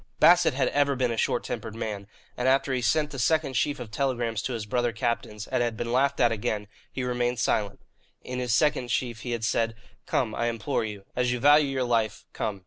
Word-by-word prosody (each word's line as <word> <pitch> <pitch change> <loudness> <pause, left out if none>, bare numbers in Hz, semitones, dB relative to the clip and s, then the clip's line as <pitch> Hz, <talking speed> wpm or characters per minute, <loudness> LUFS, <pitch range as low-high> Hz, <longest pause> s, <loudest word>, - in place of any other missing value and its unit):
Bassett 175 -4 +6
had 135 - +2
ever 140 -1 +2
been 125 -2 0
a - - -1
short 120 - 0
tempered 110 -2 -5
man, 105 -3 -4 0.3
and 125 - -1
after 135 0 +3
he 125 - 0
sent 150 +4 +1
the 135 - -6
second 155 0 +1
sheaf 145 +2 0
of 120 -3 -7
telegrams 120 -3 -1
to 125 - -3
his 110 -3 -4
brother 120 +2 0
captains, 110 -2 -3
and - - -1
had 120 -2 -1
been 120 0 -3
laughed 135 +3 +2
at 120 -2 +4
again, 105 -1 -2 0.2
he 130 - -4
remained 125 0 0
silent. 105 -4 0 0.4
In 125 0 -4
this 125 -1 -1
second 130 0 +2
sheaf 120 -1 -1
he 120 - -6
had 115 -2 -2
said: 115 0 0 0.3
"Come, 115 -5 0
I 120 - -1
implore 115 -2 -1
you. 105 -3 -6
As 125 0 +1
you 125 - -1
value 145 +3 +6
your 135 -1 -1
life, 115 -4 0
come." 100 -2 -3
120 Hz, 225 wpm, -27 LUFS, 115-130 Hz, 0.4 s, Bassett